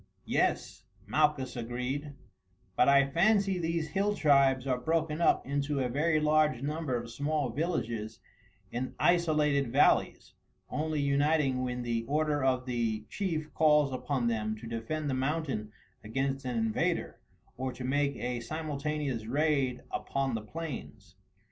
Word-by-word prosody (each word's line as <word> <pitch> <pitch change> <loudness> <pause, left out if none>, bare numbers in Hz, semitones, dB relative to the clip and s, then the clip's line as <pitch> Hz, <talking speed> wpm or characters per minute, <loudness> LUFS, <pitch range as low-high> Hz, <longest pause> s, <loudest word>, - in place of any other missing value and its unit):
"Yes," - - 0 0.2
Malchus 150 -4 +1
agreed, 125 +5 -4 0.6
"but 125 - +4
I 140 0 +5
fancy 195 +2 +3
these 165 -1 -1
hill 200 +5 0
tribes 140 -5 +4
are 130 -2 0
broken 160 +3 0
up - - +3
into 140 +1 -1
a 125 -2 0
very 155 +5 +2
large 150 -3 +2
number 150 -3 -1
of 120 0 -7
small 145 +1 -1
villages 115 -8 -2 0.5
in 125 +2 -4
isolated 150 -6 +2
valleys, 140 +4 +2 0.4
only 155 0 -1
uniting 140 -1 +2
when 125 -1 -3
the 115 -1 -1
order 150 +1 0
of 130 -1 +1
the 115 -4 -1
chief 160 -6 -3
calls 150 -3 +4
upon 130 -1 -1
them 110 -2 -1
to 115 - -10
defend 115 +7 -3
the 140 - 0
mountains 135 -5 -2 0.3
against 135 +4 -2
an 125 -2 -2
invader, 110 -1 -1 0.4
or 130 +1 -3
to 125 +1 -8
make 140 +2 +1
a 125 0 -3
simultaneous 145 -3 -3
raid 140 -2 +1
upon 135 -2 -2
the 110 - -2
plains." 110 -6 -7
140 Hz, 140 wpm, -30 LUFS, 125-155 Hz, 0.6 s, I